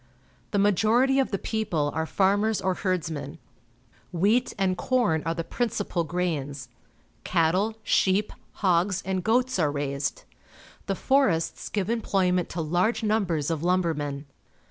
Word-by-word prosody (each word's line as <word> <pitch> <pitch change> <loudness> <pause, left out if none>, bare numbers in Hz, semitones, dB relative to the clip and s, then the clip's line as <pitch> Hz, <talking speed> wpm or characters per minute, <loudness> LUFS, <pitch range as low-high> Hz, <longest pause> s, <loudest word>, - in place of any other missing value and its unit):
The 205 - -1
majority 220 +7 +3
of 270 - +1
the 195 - -1
people 180 -10 -1
are 160 0 -2
farmers 205 +4 +2
or 185 - 0
herdsmen. 165 -6 -3 0.7
Wheat 210 +8 +2
and 190 -2 +1
corn 185 -5 +1
are 165 - 0
the 165 - -3
principal 210 -5 -2
grains. 145 -6 -3 0.5
Cattle, 185 +6 +1
sheep, 200 0 +2 0.3
hogs, 180 +1 +2
and 190 -1 -1
goats 250 0 +1
are 150 -4 +2
raised. 140 -1 -3 0.6
The 195 - 0
forests 235 -10 +1
give 200 -3 -1
emploj'ment 190 -5 +1
to 170 - -4
large 180 +9 0
numbers 180 -9 0
of 160 -2 -2
lumbermen. 160 -5 -1
185 Hz, 130 wpm, -26 LUFS, 160-215 Hz, 0.7 s, majority